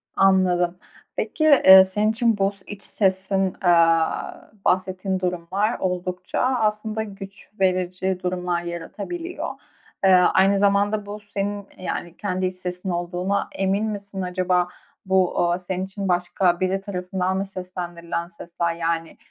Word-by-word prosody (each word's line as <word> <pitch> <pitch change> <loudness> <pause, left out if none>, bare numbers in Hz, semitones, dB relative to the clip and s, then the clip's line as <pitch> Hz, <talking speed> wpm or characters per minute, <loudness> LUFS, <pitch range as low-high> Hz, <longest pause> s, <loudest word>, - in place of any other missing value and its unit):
Anladım. 180 -2 +3 0.4
Peki, 310 - -2
eee, 190 -11 +9
senin 210 +3 0
için 230 -1 +1
bu 195 +1 +1
iç 205 -1 -8
sesin, 190 -1 0
aaa, 165 -1 +2
bahsettiğin 185 +1 0
durumlar 185 +5 -1
oldukça 180 0 -3
aslında 220 -3 0
güç 195 -1 -11
verici 185 0 0
durumlar 180 -1 -1
yaratabiliyor. 205 - -5 0.5
Eee, 190 - +5
aynı 190 +2 +5
zamanda 205 +1 +2
bu 205 +1 -7
senin, 205 0 -2
eee, 185 - -12
yani, 175 -1 -4
kendi 185 -2 -2
iç 185 0 -2
sesin 180 +1 -5
olduğuna 175 +3 -1
emin 195 +2 +1
misin 200 -2 -5
acaba? 180 0 +1 0.4
Bu, 190 -1 +2
aaa, 175 +1 +1
senin 185 +1 -3
için 195 +1 -5
başka 175 0 +1
biri 190 +1 0
tarafından 185 -1 -2
mı 195 - -1
seslendirilen 175 -2 -5
sesler? 170 -1 -3
Yani, 165 -1 -2
185 Hz, 130 wpm, -23 LUFS, 180-200 Hz, 0.5 s, eee